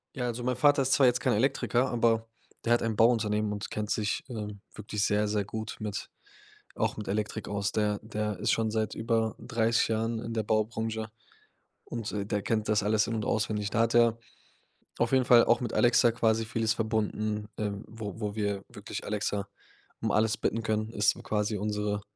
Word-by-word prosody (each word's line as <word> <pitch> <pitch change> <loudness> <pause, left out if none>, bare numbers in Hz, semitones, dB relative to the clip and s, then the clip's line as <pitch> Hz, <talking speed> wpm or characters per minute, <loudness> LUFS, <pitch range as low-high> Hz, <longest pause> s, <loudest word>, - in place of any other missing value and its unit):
Ja, 125 -2 -2
also 120 0 -3
mein 125 -1 0
Vater 145 +1 +4
ist 130 0 0
zwar 135 - +6
jetzt 125 0 +3
kein 125 +1 +2
Elektriker, 130 +2 +1
aber 115 -1 +2 0.4
der 120 - +5
hat - - +1
ein 115 -2 -1
Bauunternehmen 110 -2 +3
und 105 0 -4
kennt 105 0 -3
sich, 105 -1 0
ähm, 105 -4 -6
wirklich 105 0 -2
sehr, 105 0 +2
sehr 105 -1 0
gut 110 +2 -5
mit 105 -2 -4 0.7
auch - - 0
mit 105 - -6
Elektrik 105 +1 -2
aus. 100 0 -1
Der 105 -1 +1
der 105 -1 -3
ist - - +1
schon 110 -1 +1
seit 110 -1 -1
über 115 -1 0
30 115 -2 +1
Jahren 115 +1 -1
in 115 0 -5
der 110 -2 -1
Baubranche 110 +1 -1 0.8
und, 115 -3 -5
äh, 100 -1 -2
der 105 0 -1
kennt 110 0 -1
das 105 -1 +3
alles 105 +1 +2
in 115 - -2
und 110 - -2
auswendig. 105 -2 0
Da 115 - -1
hat 115 +1 +1
er 115 -1 +5 0.8
auf - - +2
jeden 130 -1 +3
Fall 120 -1 +7
auch 120 +1 +3
mit 120 - -3
Alexa 120 -1 +5
quasi 110 -1 +1
vieles 110 0 0
verbunden, 110 -1 -1
ähm, 105 -1 -3
wo 110 -2 -7
wo 105 0 -3
wir 100 -2 -1
wirklich - - -7
Alexa 105 -1 -2 0.5
um - - 0
alles 110 +1 +2
bitten 115 - -1
können. 110 0 -1
Ist 105 -2 +2
quasi 105 -1 -1
unsere 105 0 -1
110 Hz, 195 wpm, -29 LUFS, 105-115 Hz, 0.8 s, Fall